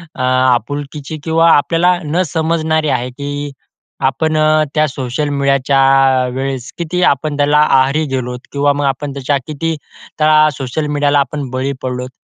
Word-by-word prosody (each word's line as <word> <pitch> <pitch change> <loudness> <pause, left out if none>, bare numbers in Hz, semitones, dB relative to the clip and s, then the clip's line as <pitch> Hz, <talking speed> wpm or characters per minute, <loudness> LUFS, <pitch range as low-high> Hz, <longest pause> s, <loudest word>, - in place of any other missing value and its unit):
अ, - - -5
आपुलकीची 135 +4 -1
किंवा 165 +1 +3
आपल्याला 170 +4 +3
न 160 +4 0
समजणारी 160 -1 0
आहे 125 -2 -1
की 145 +2 -5 0.5
आपण 155 +4 0 0.4
त्या 155 0 +3
सोशल 135 +2 -3
मीडियाच्या 140 -1 +1 0.5
वेळेस 135 -1 -4
किती 170 +1 -2
आपण 145 +1 -1
त्याला 145 +1 +3
आहारी 140 +1 +3
गेलोत 125 -1 -3
किंवा 145 0 +1
मग 145 0 -2
आपण 140 +1 -2
त्याच्या 140 +1 -1
किती 160 +2 -2 0.4
त्या 155 0 +5
सोशल 135 +3 -3
मीडियाला 145 0 +1
आपण 140 0 -3
बळी 130 +2 -2
पडलोत. 125 0 -4
145 Hz, 140 wpm, -15 LUFS, 135-155 Hz, 0.5 s, त्या